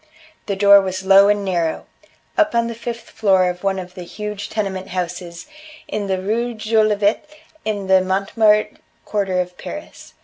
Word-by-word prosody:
The 200 - -1
door 200 0 +7
was 190 0 -4
low 195 +1 +7
and 205 -1 +1
narrow 170 -4 -1 0.5
up 310 - +2
on 235 0 +3
the 230 - -4
fifth 235 0 -7
floor 190 -4 +3
of 180 +1 -12
one 195 -1 0
of 180 -1 -7
the 180 - -9
huge 210 +3 -6
tenement 195 -3 -3
houses 175 -1 -5 0.4
in 205 -1 -3
the 190 -1 -1
Rue 230 +5 -2
Jolivet 215 +3 +1 0.4
in 205 -2 -2
the 190 0 +4
Montmartre 210 +3 +2 0.3
quarter 195 -3 -1
of 180 0 -4
Paris. 300 +1 -9
200 Hz, 165 wpm, -20 LUFS, 185-215 Hz, 0.5 s, door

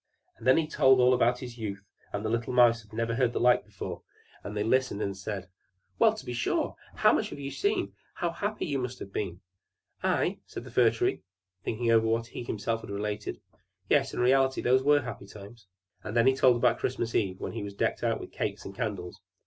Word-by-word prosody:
And 115 - -8
then 130 - +6
he 165 - +2
told 135 -4 +4
all 125 0 +6
about 125 0 +3
his 120 -2 -8
youth; 100 -2 -5 0.3
and 100 +2 -3
the - - 0
little 115 +2 -1
Mice 120 -2 +5
had 105 - -22
never 115 +1 -1
heard 120 0 +1
the - - -1
like 125 0 +4
before; 105 -2 -7 0.4
and 105 +1 -6
they 105 - +1
listened 130 -2 +1
and 100 -2 -2
said, 95 -1 -5 0.5
"Well, 220 -1 +5
to 215 - -9
be 125 - -4
sure! 120 - -1 0.2
How - - +5
much - - 0
you - - -7
have 140 - -4
seen! 405 +1 0 0.2
How 175 - -1
happy 205 +5 -3
you 140 -4 -1
must 125 0 -4
have 100 - -9
been!" 90 -4 -3 0.6
"I!" - - +1
said - - -7
the - - -11
Fir - - +5
Tree, - - -1 0.4
thinking 115 +1 0
over 115 -1 +4
what 115 +1 +1
he 115 - -9
had 120 - -7
himself 115 +2 -2
related. 105 0 -4 0.5
"Yes, - - +3
in - - -5
reality 130 +1 +3
those 130 +1 +3
were 145 +1 +4
happy 125 -6 -7
times." 100 +1 -13 0.4
And 105 +3 -3
then 115 - +5
he 130 0 +5
told 130 -2 +5
about 120 +1 +2
Christmas 120 -2 -2
eve, 95 -3 0
when - - -4
he - - -5
was 100 -1 -6
decked - - 0
out - - +1
with - - -9
cakes - - -3
and 100 - -7
candles. 100 -6 -4
115 Hz, 225 wpm, -29 LUFS, 105-130 Hz, 0.6 s, then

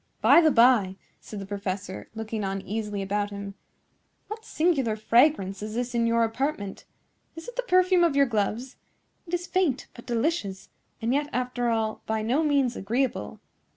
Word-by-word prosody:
"By 340 - +7
the 320 - +5
by," 230 -7 +4 0.2
said 215 - -9
the 195 - -6
professor, 195 -1 -5
looking 220 -1 -4
uneasily 200 +1 -3
about 205 +1 -1
him, 200 -1 -7 0.8
"what 435 +1 -7
singular 300 - +1
fragrance 215 -3 +2
is 215 +1 -5
this 245 +1 -2
in 235 -1 +1
your 230 0 +3
apartment? 225 -3 -3 0.5
Is 330 - -9
it 485 - -8
the - - 0
perfume 370 -5 +3
of 330 -5 +2
your 280 0 +5
gloves? 230 +2 -2 0.5
It 335 - -10
is 350 0 -4
faint, 360 -8 0
but 240 +1 -13
delicious; 230 - -2 0.3
and 235 +3 +1
yet, 290 +1 0
after 250 -1 -1
all, 220 -1 -1
by 220 0 -1
no 250 +8 +1
means 280 -5 +2
agreeable. 240 +7 -2
235 Hz, 165 wpm, -26 LUFS, 210-285 Hz, 0.8 s, By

